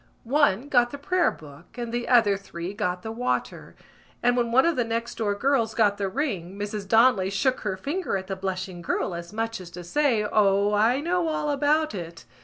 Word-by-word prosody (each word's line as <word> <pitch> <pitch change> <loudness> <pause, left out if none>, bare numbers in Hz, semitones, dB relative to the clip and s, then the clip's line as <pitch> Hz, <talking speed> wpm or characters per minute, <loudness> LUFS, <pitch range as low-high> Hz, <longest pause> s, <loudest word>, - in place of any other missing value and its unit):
One 265 -2 +2
got 245 -4 +3
the 285 - -7
prayer 360 +5 +1
book 145 - -13
and 235 -1 -5
the 240 0 -2
other 225 -5 +5
three 190 -2 -7
got 180 -4 -2
the 220 - -5
water; 245 +3 -3 0.5
and 245 0 +3
when 235 -2 0
one 265 +5 +5
of 335 -1 +2
the 245 - +1
next 230 +1 -3
door 205 -2 0
girls 230 -1 +1
got 205 -3 +2
the 195 -1 -1
ring 195 - -3
Mrs 205 -1 -4
Donnelly 225 -3 +4
shook 255 +7 0
her 200 -3 -3
finger 290 - -2
at 190 - -6
the 190 0 -4
blushing 185 -1 -4
girl 170 - -2
as 170 0 -7
much 225 -1 -3
as 180 - -10
to 175 +1 -9
say: 235 - +1
_O, 205 0 +3
I 230 +6 +3
know 345 +1 0
all 305 -1 -1
about 300 +2 +1
it! 170 - -7
220 Hz, 205 wpm, -25 LUFS, 190-260 Hz, 0.5 s, other